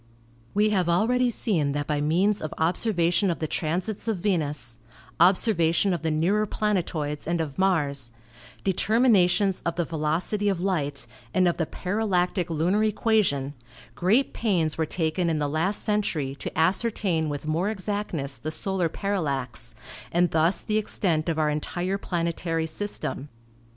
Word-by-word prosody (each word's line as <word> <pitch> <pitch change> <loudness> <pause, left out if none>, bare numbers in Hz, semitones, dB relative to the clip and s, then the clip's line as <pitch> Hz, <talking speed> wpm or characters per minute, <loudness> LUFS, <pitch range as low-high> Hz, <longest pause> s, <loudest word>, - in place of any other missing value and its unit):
We 210 +1 +3
have 185 -4 +1
already 245 +8 +3
seen 170 - +1
that 145 0 -2
by 145 -1 -1
means 185 +7 +2
of 155 0 -5
observation 175 +2 +1
of 170 - -1
the 160 - -2
transits 180 +8 -2
of 220 -3 0
Venus, 150 - -2 0.4
observation 180 0 +3
of 175 - -2
the 160 - -1
nearer 185 +8 +1
planetoids 170 -9 -2
and 170 0 0
of 150 -2 -4
Mars, 145 -10 +1 0.5
determinations 195 -2 +3
of 170 - -1
the 175 -1 0
ve 165 - -7
locity 175 +7 0
of 190 -3 -1
light 145 -9 -1 0.3
and 185 -1 +4
of 175 - +1
the 165 - -1
parallactic 180 -3 -1
lunar 175 +6 +1
equation, 210 -10 +1 0.4
great 215 +10 +2
pains 175 -9 0
were 160 -1 -1
taken 170 +1 0
in 160 - 0
the 145 -1 0
last 165 +8 -1
century 175 -10 0
to - - -6
ascertain 180 -2 +1
with 145 0 -5
more 165 +6 0
exactness 195 -9 -2
the 155 - -5
solar 180 +2 -1
parallax, 140 - -2 0.4
and 175 0 +2
thus 165 +4 +2
the 215 0 +1
extent 170 -6 -1
of 160 - -1
our 155 -1 +2
entire 175 +6 -2
planetary 170 -2 -2
system. 155 -5 -3
175 Hz, 150 wpm, -26 LUFS, 155-200 Hz, 0.5 s, and